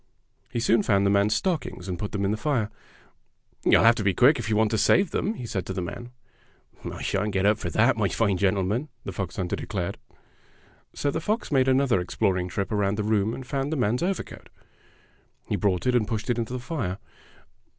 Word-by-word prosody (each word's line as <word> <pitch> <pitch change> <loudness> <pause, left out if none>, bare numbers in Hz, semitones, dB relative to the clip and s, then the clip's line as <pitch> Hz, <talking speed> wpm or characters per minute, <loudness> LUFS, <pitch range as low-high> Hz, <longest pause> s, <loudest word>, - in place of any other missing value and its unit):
He 120 - -3
soon 115 -1 +3
found 100 -2 +2
the 100 - +3
man's 100 +2 +3
stockings 160 - -2
and 90 -2 -4
put 105 - -4
them 100 -1 -1
in 100 - +1
the - - +1
fire. 110 -2 -1 0.9
"You'll - - +5
have 115 +1 +7
to 105 - -2
be 100 -1 +1
quick 135 +2 +5
if 115 - -4
you 110 - +2
want 110 0 +2
to 110 - +1
save 195 -2 +3
them," 215 - -1
he 125 - -7
said 95 -5 -3
to - - -3
the 95 - -3
man. 120 +6 -7 0.8
"I - - -7
shan't 105 +1 -1
get 95 0 +1
up 105 +1 +3
for 85 - -3
that, - - +3
my - - +2
fine 100 -4 +1
gentle 95 0 +2
man," 115 +11 -2
the - - -5
fox 95 -1 -4
hunter 90 -2 -2
declared. - - -4 1.0
So 145 - 0
the 160 - -3
fox 215 +3 -2
made 135 -2 +3
another 130 -5 +3
exploring 90 0 0
trip 100 +3 -3
around 100 -1 +1
the 105 - -1
room 105 0 +1
and 130 - -8
found 135 +2 -2
the 160 - -1
man's 120 -1 +1
over 185 +1 0
coat. - - -13 1.0
He - - 0
brought 95 -1 0
it 125 - +2
and 115 -4 +2
pushed 110 +2 -2
it 120 - -1
into 115 +1 -3
the 125 - -3
fire. 120 - -3
110 Hz, 225 wpm, -26 LUFS, 100-125 Hz, 1.0 s, have